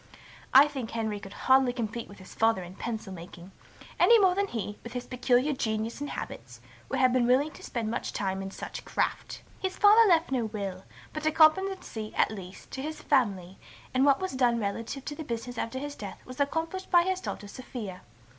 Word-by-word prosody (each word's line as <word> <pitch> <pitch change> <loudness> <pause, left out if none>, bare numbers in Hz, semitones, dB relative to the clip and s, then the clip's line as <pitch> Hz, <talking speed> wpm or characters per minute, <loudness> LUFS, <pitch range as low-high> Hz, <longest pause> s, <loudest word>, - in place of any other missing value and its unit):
I 275 +3 +8
think 265 -6 -5
Henry 220 -2 -2
could 195 -1 -10
hardly 260 -1 +5
compete 235 -1 -4
with 200 - -13
his 185 - -13
father 225 -4 +2
in 175 +1 -10
pencil 220 -1 -5
making, 175 +1 -11 0.5
any 470 - +7
more 380 -4 +5
than 400 +2 0
he, 210 - -5
with 235 - -8
his 250 -1 -4
peculiar 250 +3 +2
genius 220 0 -2
and 290 - -3
habits, - - -7 0.3
would 270 - -1
have 255 -1 +4
been 250 -2 +3
willing 270 +5 +3
to - - -13
spend 225 -2 -3
much - - -3
time 195 -3 -2
in 195 - -5
such - - -7
'craft.' - - -2 0.2
His 380 -1 -3
father 425 +1 +7
left 330 -4 +3
no 250 -4 +1
will, 200 -3 -5 0.3
but 310 0 -2
a - - +4
competency, 315 - +2
at - - +3
least, 190 -3 -10
to 265 - -5
his 310 +2 -5
family, 195 -9 0 0.3
and 260 +1 +3
what 280 -1 +5
was 375 0 -2
done 245 -3 +2
relative 230 +6 -4
to 295 - -4
the 315 - -6
business 235 -2 -5
after 230 +3 -3
his 290 +2 -4
death 205 -7 -9
was 255 +1 -10
accomplished 325 +6 -1
by 345 -1 +6
his 375 +1 -1
daughter 205 - -5
Sophia. 210 -5 -7
245 Hz, 205 wpm, -28 LUFS, 215-295 Hz, 0.5 s, I